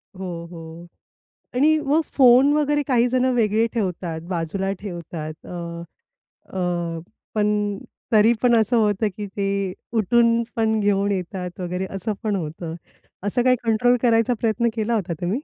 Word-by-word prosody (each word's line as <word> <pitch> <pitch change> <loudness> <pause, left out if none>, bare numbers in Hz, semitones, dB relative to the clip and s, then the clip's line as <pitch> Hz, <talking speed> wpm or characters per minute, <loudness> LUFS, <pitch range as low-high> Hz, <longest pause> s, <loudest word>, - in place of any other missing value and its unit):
हो, 175 -3 -6
हो. 165 0 -10 0.7
आणि 305 +5 +4
मग 300 +4 +3
फोन 260 +1 +6
वगैरे 295 -1 +1
काही 245 -2 +3
जण 255 0 +2
वेगळे 220 -1 +2
ठेवतात 180 -6 -2
बाजूला 185 +3 -2
ठेवतात. 170 -5 -6
अ, 180 - -8 1.0
अ, 175 -2 -1 0.4
पण 210 -1 +1 0.4
तरी 220 +2 +6
पण 245 -1 +4
असं 225 +2 +3
होतं, 210 -1 +2
की 210 - -4
ते 195 -1 -2 0.2
उठून 230 +2 +3
पण 220 -1 +1
घेऊन 200 0 +1
येतात 180 -1 -4
वगैरे 180 +1 -3
असं 205 +3 -2
पण 210 -2 0
होतं. 165 -1 -5 0.5
असं 205 +4 +1
काही 255 0 +5
कंट्रोल 240 +2 +3
करायचा 230 0 +3
प्रयत्न 235 +1 +1
केला 225 +1 -1
होता 180 -5 -2
तुम्ही? 175 +2 -4
205 Hz, 145 wpm, -22 LUFS, 180-235 Hz, 1.0 s, फोन